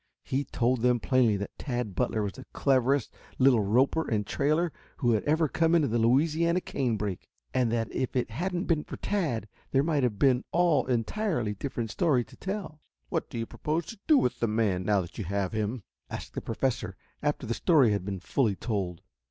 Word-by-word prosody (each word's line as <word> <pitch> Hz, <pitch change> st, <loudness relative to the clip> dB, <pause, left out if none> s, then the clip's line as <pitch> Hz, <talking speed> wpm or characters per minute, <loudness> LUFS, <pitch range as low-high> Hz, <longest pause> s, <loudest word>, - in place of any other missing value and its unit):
He 140 Hz, +2 st, -1 dB
told 125 Hz, 0 st, 0 dB
them 125 Hz, 0 st, +3 dB
plainly 120 Hz, -5 st, +3 dB
that 100 Hz, 0 st, -6 dB
Tad 120 Hz, -7 st, -3 dB
Butler 110 Hz, +3 st, 0 dB
was 100 Hz, -, -3 dB
the 130 Hz, -, -11 dB
cleverest 135 Hz, -1 st, +2 dB, 0.2 s
little 130 Hz, -4 st, +5 dB
roper 130 Hz, +10 st, +2 dB
and 105 Hz, -2 st, 0 dB
trailer 155 Hz, +8 st, +1 dB, 0.2 s
who 120 Hz, -6 st, +2 dB
ever 155 Hz, +9 st, +2 dB
had 150 Hz, -, -5 dB
come 165 Hz, +1 st, +3 dB
into 155 Hz, -4 st, +3 dB
the 120 Hz, +1 st, 0 dB
Louisiana 155 Hz, +9 st, +3 dB
canebrake, 110 Hz, -, -2 dB, 0.2 s
and 125 Hz, -3 st, +2 dB
that 115 Hz, -1 st, -1 dB
if 130 Hz, -, -2 dB
it 125 Hz, -3 st, 0 dB
hadn't 175 Hz, -, -2 dB
been 160 Hz, -6 st, +1 dB
for -, -, -8 dB
Tad 150 Hz, -, -1 dB, 0.2 s
there 135 Hz, 0 st, +3 dB
might 155 Hz, -2 st, +1 dB
have 120 Hz, -5 st, 0 dB
been 130 Hz, +1 st, +3 dB
all 170 Hz, -5 st, +3 dB
entirely 125 Hz, -, 0 dB
different 115 Hz, 0 st, -4 dB
story 145 Hz, -7 st, +2 dB
to -, -, -16 dB
tell. 190 Hz, -6 st, -5 dB, 0.3 s
"What -, -, -2 dB
do -, -, -6 dB
you 115 Hz, -, -1 dB
propose 155 Hz, +7 st, -2 dB
to 225 Hz, -, -13 dB
do 310 Hz, -2 st, +6 dB
with 125 Hz, -, +1 dB
the 115 Hz, -, +1 dB
man, 105 Hz, -4 st, +1 dB
now 105 Hz, -1 st, +3 dB
that 85 Hz, +4 st, -9 dB
you -, -, -1 dB
have 100 Hz, 0 st, -1 dB
him?" 110 Hz, +1 st, -2 dB, 0.3 s
asked -, -, -7 dB
the -, -, -4 dB
Professor 115 Hz, -5 st, -2 dB, 0.2 s
after 145 Hz, -3 st, -1 dB
the 115 Hz, -, -1 dB
story 140 Hz, -, +4 dB
had 100 Hz, -3 st, 0 dB
been 95 Hz, -1 st, -4 dB
fully 110 Hz, 0 st, +1 dB
told. 95 Hz, -6 st, -3 dB
125 Hz, 200 wpm, -28 LUFS, 110-150 Hz, 0.3 s, do